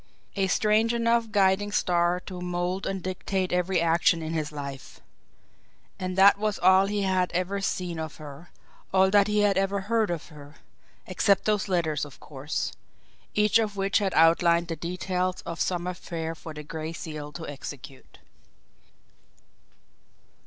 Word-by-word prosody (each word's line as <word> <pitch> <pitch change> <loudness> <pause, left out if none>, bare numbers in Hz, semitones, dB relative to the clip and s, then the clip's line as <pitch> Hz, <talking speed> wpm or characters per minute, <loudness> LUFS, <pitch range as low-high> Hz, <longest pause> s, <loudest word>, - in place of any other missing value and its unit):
A 195 -2 +1
strange 215 +4 +2
enough 230 -1 +1
guiding 205 0 +2
star 175 -2 +1
to 180 -1 -8
mould 180 +1 -2
and 195 -2 -3
dictate 185 0 -2
every 180 +1 +1
action 165 0 +2
in 160 +1 -4
his 155 -2 -2
life! 140 -3 -8 1.0
And 185 0 -4
that 200 +1 +7
was 210 -1 -1
all 190 +2 +5
he 205 0 -1
had 185 -1 +1
ever 185 +3 -1
seen 180 -3 -2
of 160 -1 -5
her, 150 +2 -11 0.4
all 190 0 +4
that 205 0 +5
he 210 0 +2
had 200 -2 +3
ever 195 0 0
heard 220 +1 0
of 170 -1 -4
her 150 -1 -13 0.5
except 195 +2 +2
those 210 -2 +1
letters, 165 -6 0
of 145 -2 -9
course, 145 +1 -4 0.6
each 210 +2 +4
of 210 -3 -2
which 195 +2 +2
had 195 -3 -1
outlined 170 +1 +4
the 165 - -2
details 180 +1 -2
of 170 - -5
some 175 -1 -1
affair 170 -2 -4
for 165 0 -10
the 150 - -7
Gray 160 +1 -6
Seal 155 -3 -7
to 165 +1 -7
execute. 140 -2 -9
180 Hz, 155 wpm, -26 LUFS, 165-195 Hz, 1.0 s, that